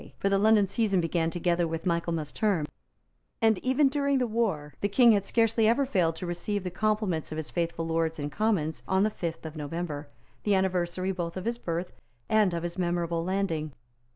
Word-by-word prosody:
For 195 - 0
the 195 0 +3
London 215 0 +5
season 200 -1 +1
began 165 -1 0
together 175 0 0
with 165 0 -4
Michaelmas 170 -3 -1
Term; 200 -8 +1 0.7
and, 220 -3 +3
even 265 +3 +3
during 280 0 +1
the 255 - +1
war, 200 - -1
the 205 - +1
King 235 +3 +6
had 200 -2 +2
scarcely 225 -1 +3
ever 255 +5 +3
failed 175 -10 +1
to 180 - -6
receive 180 +3 -3
the 180 - -4
compliments 210 -5 -1
of 155 - -4
his 160 -1 -5
faithful 170 -1 -2
Lords 165 0 0
and 145 -1 -4
Commons 165 -4 0
on 190 +1 +3
the 215 - +2
fifth 165 -4 -5
of 160 0 -6
November, 150 -1 -4 0.3
the 205 -2 +2
anniversary 185 0 0
both 175 -2 -4
of 185 - -5
his 235 +1 -2
birth 170 -1 -3 0.4
and 210 -5 +3
of 170 - -3
his 175 +2 -4
memorable 170 -1 0
landing. 170 -5 -1
180 Hz, 195 wpm, -28 LUFS, 165-215 Hz, 0.7 s, King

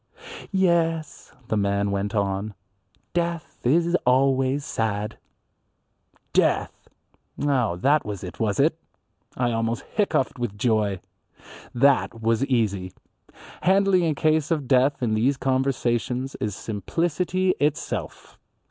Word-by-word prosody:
"Yes," 170 -5 0 0.2
the 110 - -1
man 100 0 +1
went 100 +2 -2
on, 100 +1 -1 0.6
"death 170 -1 -2
is 170 +7 +3
always 135 +2 +2
sad." 105 -1 -2 1.1
Death! - - +1 0.5
Oh, 130 -10 +1
that 140 +11 +2
was 100 -3 -6
it, 90 - -8
was 105 0 0
it? 160 +3 +2 0.6
I 120 -1 +1
almost 115 0 -1
hiccoughed 195 - -1
with 120 -4 -3
joy. 105 -4 +1 0.7
That 130 -2 +3
was 115 +2 +1
easy. 100 -8 0 0.7
Handling 190 -2 +3
a 155 - 0
case 155 0 +1
of 150 -6 -1
death 130 +1 +3
in 110 -2 +1
these 125 +6 +2
conversations 130 -1 0
is 105 -3 -2
simplicity 175 - -1
itself. 150 0 -3
130 Hz, 110 wpm, -24 LUFS, 110-155 Hz, 1.1 s, is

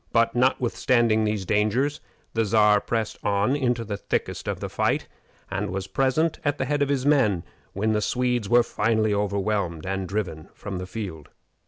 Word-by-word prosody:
But, 115 0 +3
notwithstanding 120 -3 +2
these 105 -2 -1
dangers, 110 - +1 0.3
the 115 - +2
Czar 105 -1 +4
pressed 115 -2 -2
on 105 +6 +2
into 120 -4 0
the 100 -1 -4
thickest - - -3
of - - -2
the - - -4
fight, - - 0 0.4
and - - -2
was 95 +1 -3
present 135 +10 +1
at 145 -2 0
the 130 - -1
head 145 +2 0
of 140 - +2
his 140 -2 0
men 125 - +3 0.3
when 110 +3 0
the 105 - +1
Swedes 125 -2 0
were 120 0 +6
finally 110 -1 +1
overwhelmed 100 -4 -1
and 95 -1 -3
driven 90 -7 -3
from 95 -3 -6
the 90 - -6
field. 90 -6 -6
110 Hz, 175 wpm, -25 LUFS, 100-125 Hz, 0.4 s, were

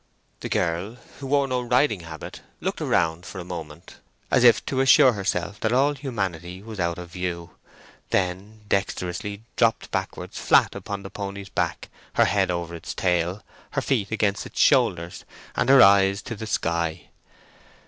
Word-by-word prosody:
The - - -5
girl, 85 +7 -1 0.2
who 135 - -6
wore 140 0 +2
no 125 -1 -1
riding 125 -3 +2
habit, 85 -1 -9 0.2
looked - - -3
around 80 +1 +1
for 95 - -9
a 90 - -5
moment, 85 -1 -8 0.3
as 125 - +4
if 120 -2 +6
to 130 - -2
assure 135 -1 +7
herself 95 -1 -2
that 110 - 0
all 140 +3 +3
humanity 95 - -4
was 110 -2 -8
out 85 -1 0
of 90 -1 -9
view, 90 -2 -4 0.6
then 95 +4 -2
dexterously 100 +1 -2
dropped 115 -2 +1
backwards - - -4
flat - - +4
upon 100 -1 -6
the 95 - -8
pony's 100 -1 -6
back, - - -2 0.3
her - - +4
head - - +1
over 85 -1 -3
its 85 - -7
tail, 90 +2 0 0.3
her - - 0
feet 110 -8 0
against 105 -2 0
its - - -8
shoulders, 85 0 +2 0.3
and 125 - +1
her 135 -1 +9
eyes 100 +1 +5
to 115 - -5
the 110 +1 -7
sky. 85 -3 -2
100 Hz, 165 wpm, -24 LUFS, 85-110 Hz, 0.6 s, her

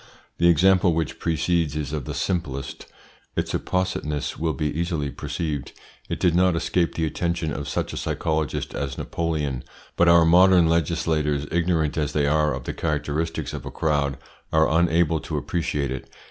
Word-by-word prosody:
The 85 - +5
example 90 0 +4
which 80 -3 -2
precedes 85 -1 0
is 75 -1 -3
of 75 -5 -3
the - - -5
simplest. 70 -8 -3 0.5
Its - - -2
appositeness 85 -5 -1
will 80 0 -1
be 75 - -2
easily 80 -4 -1
perceived. 75 -5 -4 0.4
It - - -3
did 90 - +3
not 90 0 +3
escape 85 +1 0
the 80 - 0
attention 85 0 -2
of 70 0 -4
such - - -2
a - - -5
psychologist 80 -3 -2
as 70 -2 -3
Napoleon, 75 -6 -2 0.3
but 85 - +3
our 85 -1 +7
modern 90 +1 +6
legislators, 80 -3 +1
ignorant 80 -2 +1
as 75 -1 -1
they 75 -1 +2
are 75 +1 +2
of - - -7
the - - -4
characteristics 75 +1 -2
of - - -5
a - - -6
crowd, 70 -3 0 0.3
are 80 0 +4
unable 80 -1 +3
to - - -4
appreciate 75 -5 -2
it. 65 - -6
80 Hz, 165 wpm, -24 LUFS, 75-85 Hz, 0.5 s, our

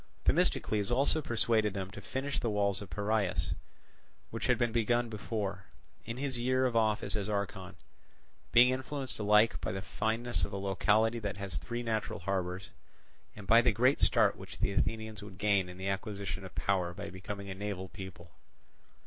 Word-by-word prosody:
Themistocles 105 -1 +2
also 140 +5 +3
persuaded 110 -5 +1
them 95 -1 -4
to 100 - -9
finish 130 +6 -3
the 120 - -1
walls 100 -2 +1
of 100 - -8
Piraeus, 100 +2 0 0.8
which - - -3
had - - +4
been 120 -1 +1
begun 120 +1 +1
before, 100 -3 -3 0.4
in 115 +2 -5
his 135 -2 -2
year 130 +2 +2
of 125 -2 0
office 110 -1 +1
as 105 -1 -2
archon; 100 -2 -3 0.8
being 120 +1 +8
influenced 130 0 -4
alike 105 -5 +4
by - - -2
the 95 +1 -4
fineness 115 +3 0
of - - 0
a - - -2
locality 105 +4 +2
that 105 -2 -4
has 100 -4 -4
three 120 0 -4
natural 110 -5 -1
harbours, 95 0 -2 0.7
and 105 - -9
by 115 +4 +7
the - - +4
great 125 +6 +3
start - - +4
which - - -10
the - - 0
Athenians 110 +2 -1
would 100 -2 -10
gain 100 -3 +2
in 90 - -9
the 95 +1 -4
acquisition 100 -1 -3
of 95 - -10
power 90 -3 0
by 100 -2 -6
becoming 100 +1 -6
a - - -2
naval 95 -1 -4
people. 90 -3 -10
105 Hz, 175 wpm, -32 LUFS, 95-115 Hz, 0.8 s, being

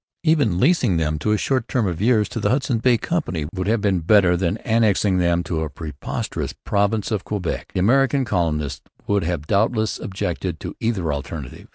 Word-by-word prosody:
Even 145 - +2
leasing 130 - +3
them 75 -1 -1
for 105 - 0
a 105 - +3
short 130 +2 0
term 125 -4 0
of 90 -2 -2
years 110 -2 +3
to - - -4
the 105 - +1
Hudson's 125 -2 0
Bay 125 -1 +4
Company 110 - -2
would 95 0 -3
have 110 0 +1
been 100 -3 +2
better 90 +1 +4
than 90 +3 0
annexing 105 -4 +2
them 85 0 +2
to 80 -1 -2
a 80 - -2
preposterous 75 -1 -5
province 100 +1 0
of 105 -4 -1
Quebec. 100 -5 -3
The 90 - +1
American 135 +5 +3
colonists 80 - -1 0.2
would 100 -1 +1
have 85 -3 -2
doubtless 110 +4 +1
objected 90 -2 -3
to - - -6
either 95 -9 -1
alternative. 70 -1 -7
100 Hz, 190 wpm, -22 LUFS, 85-115 Hz, 0.2 s, Bay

